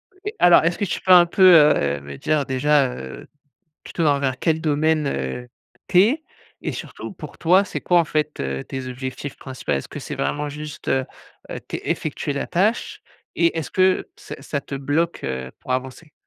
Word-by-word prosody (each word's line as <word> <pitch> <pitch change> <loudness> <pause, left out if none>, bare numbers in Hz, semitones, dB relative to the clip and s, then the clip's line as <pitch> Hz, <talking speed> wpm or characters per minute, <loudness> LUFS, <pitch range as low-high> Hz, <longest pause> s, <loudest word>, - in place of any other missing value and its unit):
OK, 405 +3 -6
alors, 175 -2 +7
est-ce 170 +1 +1
que 205 - -1
tu 180 - -3
peux 185 - +1
un 175 -1 +9
peu, 180 +2 +1
heu, 75 - +4
me 70 0 -9
dire, 150 -3 0
déjà, 135 0 +2
heu, 65 0 -9 0.6
plutôt 165 - -2
envers 140 -3 +1
quel 160 -1 +1
domaine, 155 -1 +1
heu, 70 - -4 0.4
tu 180 - +4
es? 275 +10 +2 0.4
Et - - -3
surtout, - - -7
pour - - -10
toi, 185 +4 +4
c'est - - -6
quoi, 175 -1 +3
en 165 - +2
fait, 150 0 -2
heu, 65 0 -3
tes 130 -1 -6
objectifs 130 +2 -6
principal? 130 - -4
Est-ce - - -7
que - - -8
c'est - - -6
vraiment 145 - -2
juste, 150 +1 -8
heu 130 -1 +1 0.5
heu, - - -4
té - - -7
effectuer 145 - -2
la 140 - -3
tâche? 200 +6 0 0.3
Et 170 -1 +2
est-ce 160 -5 -3
que 185 0 +2
ça - - -9
ça 145 0 -3
te 140 - -7
bloque, 145 +5 -1
heu, 65 -1 -4
pour - - -7
avancer? 130 +5 -5
150 Hz, 195 wpm, -22 LUFS, 130-170 Hz, 0.6 s, un